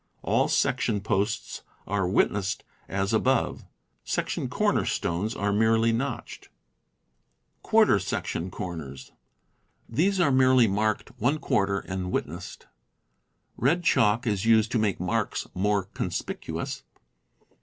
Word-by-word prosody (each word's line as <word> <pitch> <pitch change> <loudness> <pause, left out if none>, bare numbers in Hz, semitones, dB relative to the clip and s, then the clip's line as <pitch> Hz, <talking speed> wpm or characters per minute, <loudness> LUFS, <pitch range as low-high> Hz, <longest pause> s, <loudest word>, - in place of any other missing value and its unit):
All - - +2
section 125 -6 +1
posts 105 +1 -1 0.2
are 95 -2 0
"witnessed" 100 +2 +1 0.3
as 95 +2 -1
above. 125 +2 +1 0.4
Section - - -2
corner - - +1
stones 95 +7 -2
are 100 0 0
merely 110 +2 +3
notched. 120 +2 -4 1.1
Quarter - - +4
section 85 +3 -3
Corners. 80 -8 -7 0.4
— - - -43
These 195 +3 +3
are 150 -5 +4
merely 130 -2 +5
marked 105 +2 -1
^ 105 -7 +1
and 95 -1 -4
"witnessed." - - -4 0.9
Red 165 +9 +2
chalk 115 -3 +3
is 105 -4 0
used 110 0 +4
to 120 - +1
make 105 -3 0
marks 105 +5 -1
more 100 +1 +1
conspicuous. 95 - -4
105 Hz, 110 wpm, -26 LUFS, 95-120 Hz, 1.1 s, merely